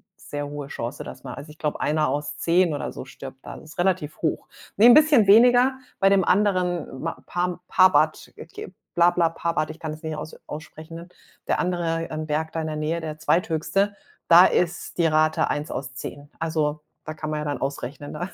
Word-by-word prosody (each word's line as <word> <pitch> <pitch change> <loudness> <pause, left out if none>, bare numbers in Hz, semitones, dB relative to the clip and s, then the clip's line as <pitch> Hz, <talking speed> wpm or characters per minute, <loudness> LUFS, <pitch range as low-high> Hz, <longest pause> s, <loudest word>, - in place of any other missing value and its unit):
sehr 145 0 -6
hohe 145 -1 -6
Chance, 125 -1 -5
dass - - -10
man 125 - -7
also, 145 +2 -9
ich 150 - -14
glaube, 150 -2 -3
1 150 0 +1
aus 145 +2 -3
10 175 0 +2
oder 145 - -4
so - - -7
stirbt 135 0 -10
da. - - -8
Das 155 - -13
ist - - -13
relativ 175 -4 0
hoch. 160 - -1 0.3
Ne, 210 - +6
'n 240 - +10
bisschen 300 -7 +6
weniger, 245 +5 +6 0.3
bei 195 - +5
dem 195 -1 +4
anderen 180 -3 +1
m 145 +5 -5 0.2
Par 180 0 -2
Parbat 160 -5 +3
okay, 170 - -9 0.2
bla 175 0 +5
bla, 170 -2 +2
Parbat. 165 -1 -2
Ich 160 - -13
kann 160 - -5
es 155 - -12
nicht 160 -1 -3
aus 155 - -7
aussprechen, 155 +2 -9
ne? 170 +1 -10 0.4
Der - - +1
andere, 170 -2 -1
ähm, 155 0 -4
Berg 155 +1 -1
da 165 - -3
in 160 - -3
der 155 - -3
Nähe, 155 +2 -2
der 155 -1 -5
Zweithöchste, 170 +5 0 0.3
da 175 +2 +9
ist 175 0 -1
die 170 - +4
Rate 155 0 +2
1 145 +1 -3
aus 135 0 -5
10. 145 +2 -8
Also, 155 -2 -1 0.3
da 155 - -5
kann 155 0 -5
man 155 - -2
ja 150 - -4
dann 145 -1 -2
ausrechnen, 140 +1 -5
ne? 175 +5 -5
160 Hz, 215 wpm, -24 LUFS, 150-175 Hz, 0.4 s, n